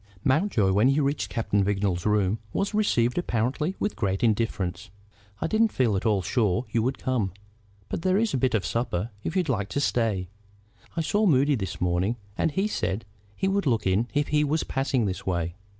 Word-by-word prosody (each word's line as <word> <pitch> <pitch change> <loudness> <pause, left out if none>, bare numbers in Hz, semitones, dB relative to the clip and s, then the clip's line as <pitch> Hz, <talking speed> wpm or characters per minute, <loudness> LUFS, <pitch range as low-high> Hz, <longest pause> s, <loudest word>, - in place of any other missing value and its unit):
Mountjoy, 130 - +2
when 105 +6 +4
he 135 +2 +3
reached 140 0 0
Captain 105 -3 0
Vignolles's 95 -2 0
rooms, 105 0 +2
was 200 +2 -1
received 150 - +2
apparently 140 - -1
with 210 - -2
great 95 -2 -1
indifference. 110 -3 0 0.5
"I - - -1
didn't 220 +6 +3
feel 120 -6 +1
at 95 +4 0
all 100 -4 +2
sure 110 +3 +1
you 115 - +2
would 130 +4 -1
come. 115 -9 -1 0.5
But - - -4
there 185 +1 +2
is 225 +1 +1
a - - +2
bit 125 -1 +2
of 100 -5 0
supper, 115 -2 -2
if - - -3
you 185 - +3
like 110 - -1
to - - -1
stay. 110 -9 0 0.7
I - - +2
saw 205 +6 +2
Moody 145 -2 +4
this 95 -8 -3
morning, 90 +5 +1 0.2
and - - +1
he 190 +7 0
said 110 - -2 0.3
he 190 - -1
would 195 -3 +1
look 115 -4 +1
in 95 +5 +2
if 145 0 +1
he 150 0 +3
was 150 +2 0
passing 135 -3 0
this 95 0 -4
way. 85 -2 -1
115 Hz, 195 wpm, -26 LUFS, 100-150 Hz, 0.7 s, when